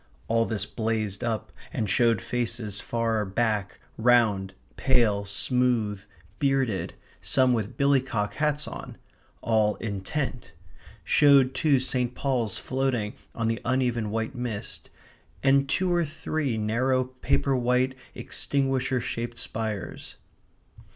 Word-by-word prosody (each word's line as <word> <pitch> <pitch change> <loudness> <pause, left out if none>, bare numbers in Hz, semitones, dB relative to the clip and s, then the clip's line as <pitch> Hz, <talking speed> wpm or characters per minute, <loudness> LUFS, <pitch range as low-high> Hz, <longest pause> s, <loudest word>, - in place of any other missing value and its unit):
All 115 0 +2
this 105 -3 -2
blazed 110 -4 -2
up 115 -4 -2 0.2
and 110 - -1
showed 115 +1 +3
faces 115 -4 -2
far 115 -2 0
back, 105 -2 -1 0.2
round, 110 -5 +3 0.2
pale, 115 -6 +2
smooth, 110 -1 0 0.4
bearded, 135 -8 0 0.3
some 130 -2 +3
with 110 -3 -2
billycock 130 -7 +1
hats 150 -1 0
on; - - -8 0.4
all 110 -2 +2
intent; 110 - -4 0.5
showed 140 -3 +5
too 140 -1 +3
St. 125 -1 -1
Paul's 125 -7 -1
floating 130 -5 -1 0.2
on 115 -1 -1
the 115 +1 -1
uneven 120 -3 0
white 110 +4 -2
mist, 120 -5 -5 0.5
and 135 0 +4
two 185 +4 +1
or 175 0 +3
three 155 -4 -2
narrow, 125 +5 +1
paper 130 +1 0
white, 125 +1 +2 0.2
extinguisher 135 -2 0
shaped 120 0 -4
spires. 110 -3 -4
120 Hz, 115 wpm, -27 LUFS, 110-130 Hz, 0.5 s, showed